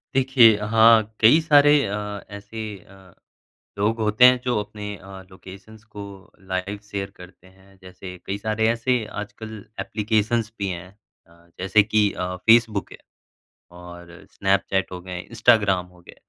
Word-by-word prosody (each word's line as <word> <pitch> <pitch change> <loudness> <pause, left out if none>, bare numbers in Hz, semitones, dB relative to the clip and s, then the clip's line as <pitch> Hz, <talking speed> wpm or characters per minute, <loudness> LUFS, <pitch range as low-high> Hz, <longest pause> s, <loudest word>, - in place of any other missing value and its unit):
देखिए 130 -4 +5
हाँ, 110 0 +4
कई 115 +9 +6
सारे 145 -2 +5
अ, 100 - -3 0.4
ऐसी 105 0 -8
अ, 95 -1 -19 0.6
लोग 110 +3 0
होते 110 +3 +4
हैं, 125 0 +6
जो 125 -3 0
अपने 105 0 -7
अ, 95 +1 -12
लोकेशंस 95 +4 -14
को 100 - -6 0.5
लाइव 95 +2 -3
शेयर 100 -1 -4
करते 90 0 -15
हैं। 95 +1 -22
जैसे 90 0 -11
कई 100 - -3
सारे 110 +1 -1
ऐसे 120 0 0 0.2
आजकल 110 +1 -9 0.2
एप्लीकेशंस 110 +1 -1
भी 100 - -2
हैं 90 0 -7 0.4
अ, 85 +1 -24
जैसे 95 +3 +3
कि 105 -1 +1
अ, 90 0 -4
फेसबुक 115 -3 +3
है। - - -11 0.8
और 85 -1 -13
स्नैपचैट 95 0 0
हो 90 - -6
गए, 90 0 -7
इंस्टाग्राम 110 -5 +2
हो 90 -1 -21
गए, 85 - -15
105 Hz, 145 wpm, -22 LUFS, 95-110 Hz, 0.8 s, कई